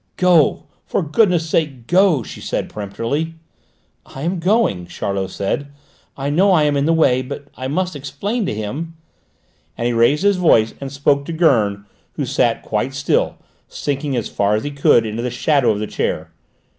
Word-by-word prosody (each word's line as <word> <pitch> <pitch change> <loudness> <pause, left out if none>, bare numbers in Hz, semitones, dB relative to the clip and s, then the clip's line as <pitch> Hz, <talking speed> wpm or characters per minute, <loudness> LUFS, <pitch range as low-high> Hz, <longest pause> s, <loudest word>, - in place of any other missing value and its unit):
"Go, 175 -5 +3 0.2
for - - 0
goodness' 170 0 +2
sake, 150 -7 -1
go," 175 -4 +3
she - - -10
said - - -3
peremptorily. 115 +11 -3 0.7
"I 135 - -9
am 175 +2 -1
going," 175 - +1
Charlot 95 +2 -3
said; 100 +9 -2 0.5
"I 140 +1 -2
know 185 +7 +3
I 165 -5 +4
am 145 -1 +2
in 140 +1 +1
the - - +3
way; 135 -6 +3
but 140 +2 -8
I 130 - -5
must 180 +4 -1
explain 145 - -3
to - - -1
him," 140 +11 -5 0.8
and 120 - -2
he 120 - +1
raised 120 +8 +3
his 200 -1 +3
voice 115 -11 +3
and 135 -1 -5
spoke 140 0 +1
to 170 - -5
Gurn, 110 - +2 0.3
who - - -3
sat - - +1
quite - - -2
still, - - +1 0.3
sinking 140 -1 -3
as 120 - -1
far 100 +1 +1
as 110 - -2
he 145 - -4
could 140 -5 +3
into 110 +1 -3
the 125 - -2
shadow 130 +1 +2
of 105 - +2
the 105 - -2
chair. - - -3
140 Hz, 180 wpm, -19 LUFS, 115-165 Hz, 0.8 s, I